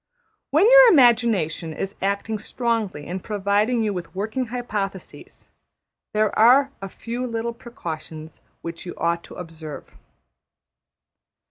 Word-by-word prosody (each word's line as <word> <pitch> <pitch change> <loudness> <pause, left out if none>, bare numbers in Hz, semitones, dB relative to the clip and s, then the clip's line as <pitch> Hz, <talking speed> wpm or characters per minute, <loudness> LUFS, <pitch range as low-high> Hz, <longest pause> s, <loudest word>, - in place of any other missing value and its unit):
When 320 +9 +4
your - - +9
imagination 225 - +3
is 195 +5 -5
acting 200 +2 -1
strongly 220 -8 -2
in 180 +2 -4
providing 210 +4 0
you 210 -2 0
with 180 -1 -7
working 220 +6 -2
hypotheses, 210 -6 -6 0.6
there 215 -1 +1
are 260 +5 +6
a 195 - -5
few 240 +5 -5
little 230 0 -3
precautions 160 -9 -8 0.2
which 165 0 -6
you - - -6
ought 170 0 0
to - - -12
observe. 160 -3 -9
210 Hz, 120 wpm, -23 LUFS, 175-235 Hz, 0.6 s, your